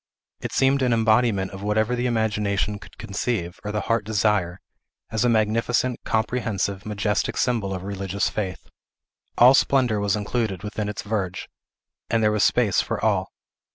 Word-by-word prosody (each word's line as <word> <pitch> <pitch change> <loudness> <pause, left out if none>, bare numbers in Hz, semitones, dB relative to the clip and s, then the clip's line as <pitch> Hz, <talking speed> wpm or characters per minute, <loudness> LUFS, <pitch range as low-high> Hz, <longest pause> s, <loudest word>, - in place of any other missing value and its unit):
It - - -5
seemed 135 +1 +2
an 125 -2 +2
embodiment 110 -3 +2
of 95 0 -8
whatever 110 +3 +1
the 125 +1 -1
imagination 105 -3 0
could - - -15
conceive, 95 -3 -3
or 105 - -3
the 105 0 -1
heart 115 -1 0
desire, 100 -4 0 0.5
as 110 0 0
a 120 - +3
magnificent, 115 +3 +1
comprehensive, 105 -4 -1
majestic 105 0 -1
symbol 115 -6 0
of 95 -1 -4
religious 100 0 -2
faith. 95 -8 -4 0.7
All 125 +2 +8
splendor 130 -5 +3
was 100 -2 +1
included 105 -2 -2
within 105 0 -3
its 105 - -5
verge, 100 -4 -3 0.6
and 115 -1 +1
there 105 - +4
was 105 -1 +1
space 115 -5 +3
for - - -3
all. - - +1
105 Hz, 155 wpm, -24 LUFS, 100-115 Hz, 0.7 s, All